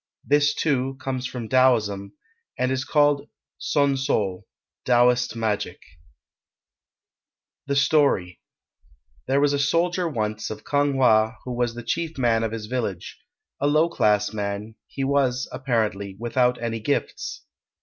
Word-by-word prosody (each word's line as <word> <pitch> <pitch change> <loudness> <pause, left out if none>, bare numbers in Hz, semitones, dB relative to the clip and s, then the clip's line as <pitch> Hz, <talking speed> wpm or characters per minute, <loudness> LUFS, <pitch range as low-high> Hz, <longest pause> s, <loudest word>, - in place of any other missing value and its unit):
This, 145 0 +3
too, 135 -3 0
comes 130 -1 -3
from 125 -3 -6
Taoism, 110 -6 +2 0.4
and 130 +1 0
is 130 0 -1
called 145 -1 +2 0.3
son 140 -2 +1
sul, 105 -9 -1 0.4
Taoist 125 -1 +3
magic] 105 -2 -2 1.9
The 140 - 0
Story 140 - +2 0.9
There 135 - +2
was 145 0 +3
a 140 - 0
soldier 170 +4 +1
once 110 -5 -3
of 110 - -8
Kang 145 -1 +1
wha 110 -3 +4
who 125 - -5
was 120 -1 -1
the 120 - -7
chief 165 +6 -3
man 120 -3 +2
of 115 -1 -1
his 110 -1 -5
village; 105 -7 -4 0.4
a 145 - +1
low 155 +3 +3
class 105 -8 +1
man, 105 +1 -4
he 135 - -4
was, 135 -2 +1
apparently, 105 -6 -1
without 125 +1 +1
any 115 -1 -3
gifts. 480 - -3
125 Hz, 135 wpm, -24 LUFS, 110-140 Hz, 1.9 s, wha